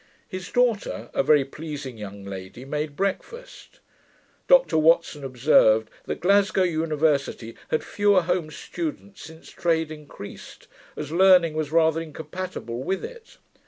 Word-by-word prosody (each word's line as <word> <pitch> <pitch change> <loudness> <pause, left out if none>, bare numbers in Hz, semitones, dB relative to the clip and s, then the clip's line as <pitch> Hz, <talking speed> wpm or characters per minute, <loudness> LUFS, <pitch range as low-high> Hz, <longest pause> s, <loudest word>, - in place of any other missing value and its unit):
His 185 -1 -7
daughter, 245 -4 0
a - - +2
very 140 0 +4
pleasing 145 -3 -7
young 100 -2 -9
lady, 95 +5 -8
made 150 +1 -3
breakfast. 470 - -5 0.7
Dr - - +5
Watson 160 -2 +3
observed, 120 -4 +3
that - - -5
Glasgow 200 +1 +3
University 155 -8 0
had 155 - -1
fewer 205 -3 +2
home 175 -2 -1
students, 215 - -6
since 160 +2 -12
trade 160 -2 0
increased, 150 -9 -11 0.3
as 150 -1 -5
learning 180 -2 +5
was 155 -1 -3
rather 160 0 +3
incompatible 160 -6 -6
with 190 +8 -2
it. 470 -2 -12
160 Hz, 125 wpm, -24 LUFS, 140-185 Hz, 0.7 s, Dr